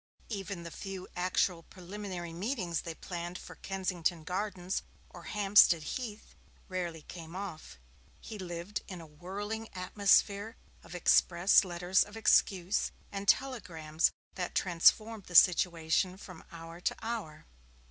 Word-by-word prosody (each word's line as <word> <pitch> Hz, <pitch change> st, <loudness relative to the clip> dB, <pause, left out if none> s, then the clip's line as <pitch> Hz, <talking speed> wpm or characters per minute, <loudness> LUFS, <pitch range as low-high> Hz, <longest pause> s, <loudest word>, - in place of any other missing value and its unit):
Even 195 Hz, -4 st, -5 dB
the 170 Hz, -, -7 dB
few 190 Hz, 0 st, -7 dB
actual 180 Hz, -1 st, +1 dB
preliminary 180 Hz, -1 st, -7 dB
meetings 180 Hz, -, -2 dB
they 165 Hz, -1 st, -6 dB
planned 175 Hz, +1 st, -6 dB
for -, -, -10 dB
Kensington 180 Hz, -3 st, -2 dB
Gardens 185 Hz, +1 st, -2 dB, 0.3 s
or -, -, -12 dB
Hampstead 200 Hz, -5 st, +5 dB
Heath 215 Hz, +5 st, -6 dB, 0.3 s
rarely 175 Hz, -4 st, -4 dB
came 170 Hz, -1 st, -10 dB
off. 185 Hz, -, -7 dB, 0.4 s
He 215 Hz, -, -9 dB
lived 175 Hz, +2 st, -5 dB
in 185 Hz, -2 st, -7 dB
a 165 Hz, -, -10 dB
whirling 200 Hz, +8 st, -6 dB
atmosphere 200 Hz, +3 st, +2 dB, 0.3 s
of -, -, -11 dB
express 175 Hz, +2 st, +5 dB
letters 180 Hz, +1 st, +1 dB
of 205 Hz, +1 st, -11 dB
excuse, 195 Hz, -3 st, +3 dB, 0.2 s
and 200 Hz, 0 st, -5 dB
telegrams 175 Hz, -13 st, +1 dB, 0.2 s
that 180 Hz, -2 st, -4 dB
transformed 205 Hz, +4 st, +3 dB
the 180 Hz, -, -9 dB
situation 175 Hz, +1 st, +4 dB
from 185 Hz, -4 st, -11 dB
hour 165 Hz, +1 st, -10 dB
to -, -, 0 dB
hour. 220 Hz, -10 st, -5 dB
185 Hz, 125 wpm, -31 LUFS, 170-200 Hz, 0.4 s, Hampstead